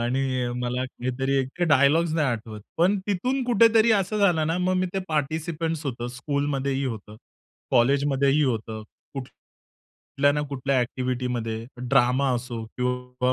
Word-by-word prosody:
आणि 125 +3 0 0.3
मला 125 +1 -2
काहीतरी 130 +1 -3
एक 135 +6 -3
डायलॉग्स 155 +3 +4
नाही 155 -3 +2
आठवत. 110 -2 -4 0.2
पण 185 +5 +3
तिथून 250 +7 0
कुठेतरी 230 -1 +5
असं 205 +1 +1
झालं 175 -6 +3
ना 165 - 0
मग 185 +1 +1
मी 185 0 +1
ते - - +1
पार्टिसिपंट्स 160 +1 -2
होतो, 120 -2 -3
स्कूलमध्ये 140 +2 -2
ही 135 - -1
होतं. 110 -4 -6 0.5
कॉलेजमध्येही 140 +3 +3
होतं. 110 -4 -2 0.3
कुठ 135 -2 -5
कुठल्या 145 +1 -4
ना 150 - 0
कुठल्या 135 -1 0
एक्टिव्हिटीमध्ये. 125 -2 -2 0.2
ड्रामा 130 +1 +2
असो 120 -2 -4
किंवा 125 0 -1
135 Hz, 140 wpm, -25 LUFS, 125-160 Hz, 0.5 s, कुठेतरी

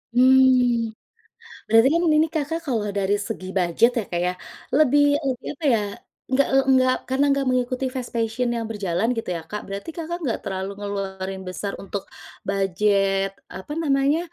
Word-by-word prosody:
Mmm, 255 -2 +5 0.8
berarti 225 +2 +5
kan 335 - +3 0.2
ini, 315 +1 +4
Kakak, 320 +2 -1
kalau 230 -6 0
dari 200 +1 +1
segi 185 -4 -5
budget 180 +7 +3
ya, - - 0
Kak, 175 -1 -1
ya, 180 - +1 0.4
lebih 290 -1 +5 0.3
lebih 250 -2 -4
apa 315 - -10
ya, - - +3 0.5
nggak, 275 +1 +4
eee, 270 0 +4
nggak 255 0 +4 0.2
karena 265 +2 +2
nggak 275 -1 0
mengikuti 255 +1 0
fashion 240 -1 -2
yang 230 - -3
berjalan 200 -1 -1
gitu 225 - -4
ya, 165 - -4
Kak. 210 - -3
Berarti, 200 +11 -6
Kakak, 340 +1 -4
nggak 235 - -1
terlalu 190 0 -3
ngeluarin 195 -2 -4
besar 200 +2 -4
untuk 195 0 -5 0.5
budget, 195 0 +1 0.3
apa 190 +10 -7
namanya 280 +1 +2
230 Hz, 160 wpm, -23 LUFS, 195-265 Hz, 0.8 s, Mmm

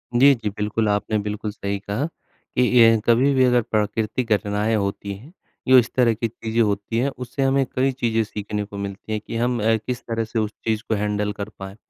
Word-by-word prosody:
जी, 140 +3 +7
जी, 110 -3 -3
बिल्कुल, 105 +2 -1
आपने 105 +1 0
बिल्कुल 105 +1 -4
सही 100 -1 -4
कहा, 105 +8 -2
कि 160 -5 -6 0.2
ये 115 -1 +7
कभी 125 +4 +4
भी 130 -1 +4
अगर 125 -1 +4
प्राकृतिक 110 +3 -1
घटनाएँ 105 +2 0
होती 100 -1 -2
हैं, 130 - -13 0.3
जो 130 0 +8
इस 120 - 0
तरह 120 -3 +4
की 115 +1 -2
चीज़ें 115 +1 -2
होती 100 +1 0
हैं 135 +4 +2
उससे 125 +2 -5
हमें 135 0 +2
कई 135 +1 +2
चीज़ें 115 -3 0
सीखने 105 0 -4
को 100 0 -9
मिलती 100 +2 -6
हैं 110 - 0
कि - - -5
हम 120 0 0
अ, 115 0 +4
किस 120 +3 -4
तरह 115 -1 -1
से 110 +1 -3
उस 105 -1 -1
चीज़ 110 0 0
को 110 - +2
हैंडल 105 0 -1
कर 100 +1 -4
पाएँ 95 0 -7
110 Hz, 215 wpm, -22 LUFS, 105-120 Hz, 0.3 s, जो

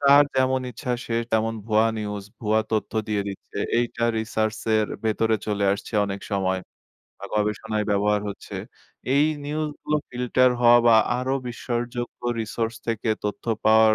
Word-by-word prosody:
যার 140 +1 +7
যেমন 130 0 +3
ইচ্ছা 125 +2 -5
সে 115 - -3 0.2
তেমন 110 0 +2
ভুয়া 110 0 +4
নিউজ, 105 -1 -4 0.2
ভুয়া 110 0 +2
তথ্য 110 -1 0 0.2
দিয়ে 105 -1 0
দিচ্ছে। 100 - -8 0.2
এইটা 120 0 0
research 110 0 -1 0.2
এর 110 - +2 0.2
ভেতরে 110 0 +2
চলে 105 -1 0
আসছে 100 +3 -6
অনেক 100 -1 -4
সময 95 -1 +1 0.6
বা - - -9
গবেষণায় 105 +1 0
ব্যবহার 105 +1 +2
হচ্ছে। 100 - -8 0.6
এই 145 +1 +5 0.2
নিউজ 155 +1 -2
গুলো 150 - +1
ফিল্টার 125 +1 +3
হওয়া 120 0 +7
বা 115 -1 +7 0.2
আরো 130 +2 0
বিশ্বাসযোগ্য 120 0 -4 0.2
resource 115 +1 -2
থেকে 115 0 -1 0.2
তথ্য 105 - -3 0.2
পাওয়ার 110 0 +6
110 Hz, 150 wpm, -24 LUFS, 105-120 Hz, 0.6 s, যার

